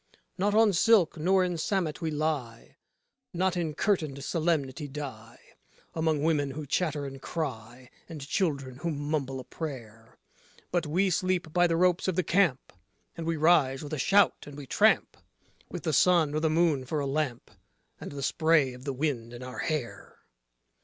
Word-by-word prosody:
Not 205 +2 0
on 220 -2 +5
silk 185 -1 +4
nor 185 +4 +3
in 180 -1 -2
samet 180 -3 -1
we 165 - -1
lie, 145 -7 -3 0.6
not 185 +1 +1
in 165 -4 -2
curtained 155 -9 -1
solemnity 155 -3 -1
die 130 -6 -8 0.5
Among 160 -2 0
women 150 -3 +1
who 150 +2 -6
chatter 150 0 -1
and 135 -1 -8
cry, 125 -6 -6 0.2
and 150 -4 -8
children 140 -8 -1
who 170 - -3
mumble 145 -3 -2
a - - -7
prayer. 115 -8 -8 0.5
But 175 -3 0
we 185 +5 +1
sleep 180 -3 -1
by 175 0 +4
the 165 -1 0
ropes 180 +1 +2
of 185 - 0
the 185 - +1
camp, 170 -9 +1 0.4
and 165 -1 -5
we 165 -1 0
rise 150 -4 +3
with 145 - -7
a 155 - -2
shout, 200 +6 +3
and 145 -1 -10
we 145 - -8
tramp - - +2 0.5
With 175 - -7
the 160 -3 -1
sun 165 -1 +4
or 155 - 0
the 160 0 +1
moon 155 -4 +2
for 150 +4 -3
a 140 - -2
lamp, 135 -3 -2 0.5
and - - -8
the 140 -1 -6
spray 155 -4 +2
of 125 +1 -12
the 140 - -2
wind 125 -4 -2
in 120 +1 -8
our 125 0 -7
hair. 155 -7 -4
155 Hz, 175 wpm, -28 LUFS, 135-170 Hz, 0.6 s, on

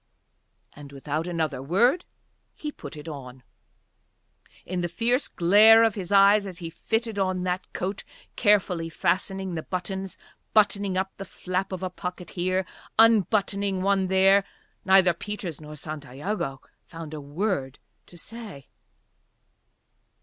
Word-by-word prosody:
And 145 -1 -12
without 150 +4 -3
another 160 -6 -2
word 235 - +2 0.5
he 300 - -5
put 145 - -10
it 150 +2 -10
on. 130 -4 -9 1.2
In 180 0 -3
the 175 - -2
fierce 240 - 0
glare 215 +6 +6
of 225 -2 +3
his 195 -2 -6
eyes 200 +1 +6
as 185 -3 -7
he 165 -3 -6
fitted 225 +4 -2
on 185 -1 0
that 180 0 -3
coat, 190 +2 -4 0.3
carefully 185 -6 +2
fastening 190 +2 -1
the 160 - -3
buttons, 190 +2 -5 0.4
buttoning 200 -2 +3
up 190 +1 -1
the 195 - -6
flap 185 +1 -3
of 185 -1 -5
a 185 - -2
pocket 180 0 -7
here, 185 +1 -1 0.3
unbuttoning 200 -3 +3
one 195 -1 +2
there, 190 +1 +5 0.4
neither 190 -2 +5
Peters 180 -4 -6
nor 150 0 -9
Santiago 150 +1 -5 0.2
found 165 -2 -9
a 150 - -6
word 145 -2 -2 0.3
to 175 - -14
say. 210 - -10
185 Hz, 135 wpm, -26 LUFS, 165-200 Hz, 1.2 s, glare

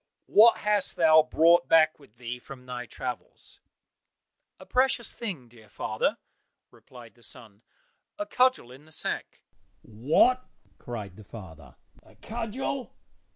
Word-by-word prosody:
"What 230 +2 +6
hast 210 -2 +2
thou 160 -1 +6
brought 170 +3 +3
back 155 -1 +4
with 125 -6 -21
thee 120 0 -6
from 125 0 -12
thy 125 -1 -6
travels?" 125 +3 -8 1.0
"A - - -12
precious 255 -2 +1
thing, 185 - -6
dear 115 -3 -19
father," 110 0 -2 0.5
replied 120 -4 -15
the 120 - -25
son, 110 -2 -7 0.6
"a 310 - -3
cudgel 255 - +1
in 135 +4 -15
the 155 - -19
sack." - - -4 0.4
"What!" 150 - +2 0.4
cried 105 -6 -7
the 110 - -12
father, 90 - -12 0.3
"a - - -22
cudgel! 240 +3 -5
135 Hz, 130 wpm, -27 LUFS, -, 1.0 s, What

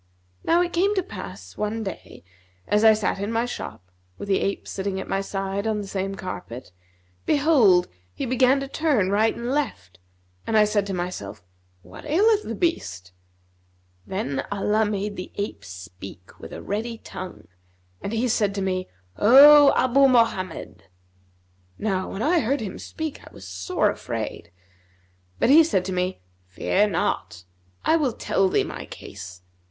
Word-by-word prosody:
Now 345 +2 +3
it 350 - -4
came 395 +4 +2
to 380 - +1
pass 95 - -9
one 215 +1 -2
day, 190 - -8 0.4
as 210 +1 +2
I 220 -1 +8
sat 210 -2 -1
in 200 +2 -3
my 230 +1 +1
shop, 95 - -7 0.3
with 205 - -7
the 195 - +3
ape 200 - -2
sitting 190 -1 -3
at - - -6
my 195 - -1
side 195 +1 -3
on 215 -1 0
the 205 - -5
same 195 0 -3
carpet, 125 - -7 0.6
behold, 265 - +4 0.2
he - - -4
began 255 +2 +3
to 275 - -4
turn 275 - +1
right 215 +2 +2
and 240 +1 -4
left, 90 - -3 0.5
and 220 - +2
I 215 - +7
said 205 -1 0
to 195 - -3
myself, 110 - -5 0.4
'What 90 +3 -12
aileth 420 +7 +3
the - - -5
beast?' 95 - -2 1.0
Then 190 -9 -2
Allah 210 +2 +1
made 205 0 -3
the 180 - -7
ape 200 - -4
speak 90 0 -11
with - - -10
a - - -8
ready 225 +3 -3
tongue, 185 -4 -9 0.5
and 200 - -4
he 230 +2 0
said 205 -3 +1
to 200 - -2
me, 185 -1 -2 0.3
'O 280 +6 +8
Abu 265 +2 +4
Mohammed!' 185 - 0 0.9
Now 190 -3 -1
when 200 - -4
I 335 +4 +3
heard 275 +2 0
him 200 -4 -6
speak, 315 -2 -6
I - - -14
was 95 - -12
sore 90 0 0
afraid; 85 - -6 0.9
but 250 - +3
he 320 +3 +8
said 190 - 0
to 190 - -3
me, 180 - -2 0.3
'Fear 195 - +1
not; 90 - -2 0.4
I 325 - +4
will 280 -7 0
tell 195 -2 +1
thee - - +2
my - - -7
case. 90 -2 -10
205 Hz, 165 wpm, -24 LUFS, 180-250 Hz, 1.0 s, I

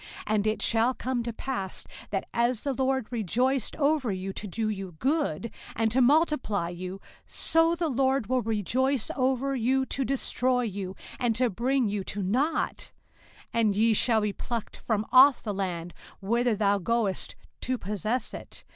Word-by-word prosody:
05:028:063 - - -14 0.2
And 210 0 +2
it 215 - 0
shall 230 +3 +3
come 255 -1 -2
to 235 0 -3
pass, 225 -5 -4 0.2
that 195 -2 -2
as 235 -1 +1
the 280 - 0
LORD 265 -1 0
rejoiced 245 +3 0
over 285 -5 +1
you 190 0 -4
to 210 - -6
do 220 +4 -2
you 195 -4 -4
good, 260 - -1 0.2
and 225 -1 +1
to 260 +3 +3
multiply 255 - +2
you; 180 +2 -6 0.3
so 330 +1 +2
the 340 -1 -1
LORD 265 -2 +1
will 255 +3 +1
rejoice 230 +4 0
over 265 +1 +1
you 265 +2 +1
to 270 - -2
destroy 255 -1 0
you, 195 -4 -4 0.2
and 235 -2 +1
to 245 0 +1
bring 250 +4 +1
you 200 -1 -2
to 200 0 -3
nought; 255 - 0 0.6
and 220 -3 +2
ye 225 +2 +4
shall 220 +1 +3
be 210 -1 -1
plucked 230 0 -4
from 220 -2 -1
off 265 +1 +7
the 210 - -2
land 175 -3 -3 0.3
whither 235 +3 +1
thou 200 -1 +2
goest 210 0 -1 0.3
to 255 0 -1
possess 215 +3 -2
it. - - -9
235 Hz, 170 wpm, -28 LUFS, 205-260 Hz, 0.6 s, off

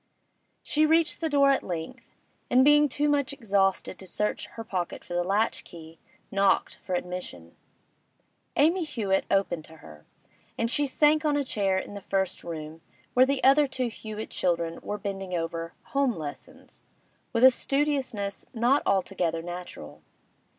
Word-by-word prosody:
She 310 +1 +2
reached 325 +1 +2
the 325 - 0
door 280 -1 +5
at 270 - +2
length, 165 -3 -6 0.4
and 260 +1 +5
being 295 0 +6
too 290 +3 0
much 290 -2 +1
exhausted 195 -8 0
to 190 - -10
search 210 +4 -2
her 225 - -8
pocket 185 -5 -4
for - - -8
the 175 0 +1
latch 205 +5 0
key, 165 -1 -13 0.3
knocked 195 0 +2
for 185 - -4
admission. 175 - -6 1.0
Amy 335 +5 +3
Hewett 210 -11 -1
opened 195 -5 +1
to 160 - -14
her, 75 - -14 0.5
and 230 +1 0
she 290 +1 +1
sank 300 +3 +3
on 295 -2 +2
a 285 - +1
chair 195 -7 0
in 190 - -5
the 200 - -7
first 190 -1 -2
room, 160 -1 -7 0.3
where 255 +1 +5
the 275 -1 -1
other 280 +2 +6
two 255 -2 -2
Hewett 215 -1 -7
children 170 -2 -1
were 210 - -4
bending 195 -2 -4
over 165 0 -3
'home 275 -4 0
lessons' 150 -3 -9 0.5
with 230 -1 +1
a 260 - +10
studiousness 265 -8 -1
not 245 +5 +3
altogether 180 -4 0
natural. 175 +1 -8
205 Hz, 155 wpm, -27 LUFS, 175-275 Hz, 1.0 s, a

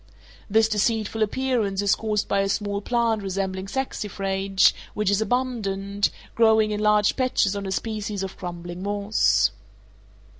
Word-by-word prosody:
This 220 +2 +4
deceitful 220 0 0
appearance 220 -3 0
is 200 0 +4
caused 215 -1 -1
by 200 - +1
a 195 0 +1
small 200 0 -1
plant 230 -1 0
resembling 190 0 -3
saxifrage, 195 -5 0 0.2
which 210 -2 +1
is 200 +1 +2
abundant, 205 -4 -1 0.2
growing 220 -2 +4
in 210 - -2
large 210 -1 +3
patches 255 -6 +1
on 200 -1 -4
a - - -3
species 210 -1 -3
of 190 - -6
crumbling 175 0 -7
moss. 200 - +2
205 Hz, 140 wpm, -24 LUFS, 195-220 Hz, 0.2 s, This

